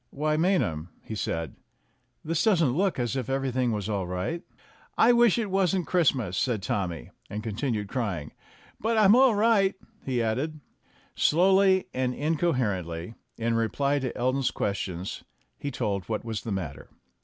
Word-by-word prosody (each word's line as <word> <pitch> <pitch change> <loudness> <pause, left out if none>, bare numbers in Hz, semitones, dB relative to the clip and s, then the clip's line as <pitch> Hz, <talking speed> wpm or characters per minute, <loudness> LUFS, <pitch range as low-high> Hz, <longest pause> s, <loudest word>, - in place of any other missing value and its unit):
"Why, 155 +2 -1
Maynham," 155 - +1
he - - -7
said, 80 - -3 0.7
"this 165 +1 0
doesn't 170 - +3
look 195 +2 +1
as 120 -1 -1
if 130 -2 -3
everything 130 -2 0
was 105 -2 -2
all 100 -4 -2
right." 90 - -3 0.6
"I 235 - +6
wish 235 -3 +5
it 215 -4 -2
wasn't 190 -2 +1
Christmas," 130 - +1
said 115 -7 0
Tommy, 95 -9 -3 0.2
and 105 +1 -5
continued 110 -1 -2
crying. 100 - -3 0.5
"But 225 +1 0
I'm 210 0 +7
all 255 -3 +5
right," 205 -2 +3 0.3
he 125 -3 0
added. 140 +8 -2 0.6
Slowly 190 +3 +4
and 125 -1 -1
incoherently, 115 - -1 0.2
in 115 0 0
reply 140 +6 +1
to 130 -3 -4
Elton's 130 +1 +1
ques 100 0 -2
tions, 90 -1 -5 0.4
he 145 - -3
told 105 -8 -2
what 110 +1 -2
was 110 -2 -3
the 115 - -5
matter. 80 -8 -5
130 Hz, 155 wpm, -27 LUFS, 105-170 Hz, 0.7 s, I'm